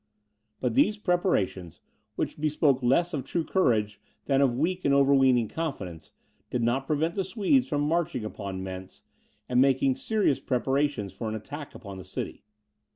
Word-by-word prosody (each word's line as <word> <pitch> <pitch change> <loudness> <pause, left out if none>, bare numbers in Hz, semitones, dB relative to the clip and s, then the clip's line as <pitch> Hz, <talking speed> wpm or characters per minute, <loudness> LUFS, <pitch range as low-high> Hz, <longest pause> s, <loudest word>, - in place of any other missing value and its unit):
But 125 -3 -1
these 210 - +3
preparations, 175 - 0 0.4
which - - -3
bespoke 150 -3 +2
less 150 +8 +2
of 140 -4 -2
true 165 +5 -2
courage 105 - +1 0.2
than 135 -1 +2
of 130 -4 +3
weak 180 +6 0
and 140 -1 +3
overweening 135 -4 +4
confidence, 100 - -5 0.4
did 120 - -1
not 130 +4 0
prevent 160 +2 0
the 195 - -1
Swedes 220 +7 +2
from 145 -1 -1
marching 150 -7 0
against 110 - -8 0.2
Mentz, 95 0 -8 0.4
and 125 0 +3
making 135 -1 +3
serious 215 -11 +1
preparations 135 -4 0
for 115 - -4
an 110 - -3
attack 145 +7 -8
upon 100 -2 -9
the - - -8
city. - - -6
135 Hz, 160 wpm, -27 LUFS, 115-160 Hz, 0.4 s, overweening